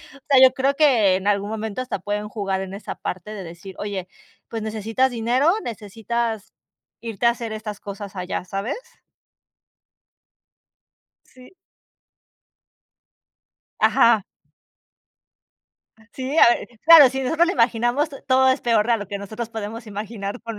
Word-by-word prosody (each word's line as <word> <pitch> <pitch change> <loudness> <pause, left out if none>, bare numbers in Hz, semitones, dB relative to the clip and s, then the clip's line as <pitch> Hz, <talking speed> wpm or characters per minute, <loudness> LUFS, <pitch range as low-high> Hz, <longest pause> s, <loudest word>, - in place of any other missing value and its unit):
O - - -15
sea, 275 -2 +6
yo 260 - +7
creo 275 +1 0
que 240 -11 +4
en 190 +1 -4
algún 205 0 +1
momento 220 +1 -4
hasta 255 -5 -3
pueden 205 +3 -4
jugar 195 -3 -2
en 190 0 -6
esa 200 - -6
parte 185 +3 -6
de 200 - -7
decir: 175 +3 -10
"Oye, 200 -3 -4 0.4
pues 225 -1 -4
necesitas 220 +4 0
dinero, 245 +6 +2
necesitas 225 0 -4 0.5
irte 230 0 -4
a 235 - +6
hacer 235 -2 -6
estas 215 -1 -6
cosas 200 -1 -8
allá", 180 -1 -4
¿sabes? 195 - -4 2.5
Sí. 255 -1 -17 2.3
Ajá. 230 -3 +4 1.9
Sí, 265 +4 -4
a - - +9
ver - - -7 0.2
claro, 320 -5 +9
si 265 +1 -4
nosotros 325 +6 +2
lo 360 - 0
imaginamos, 240 +5 +1
to 275 - -11
todo 260 0 +3
es 260 +2 +2
peor 230 -1 +1
a 235 - +4
lo 205 - -7
que 200 - -5
nosotros 215 +3 -6
podemos 225 +1 -7
imaginar 205 +1 -6
con 230 -2 -7
225 Hz, 145 wpm, -22 LUFS, 205-250 Hz, 2.5 s, a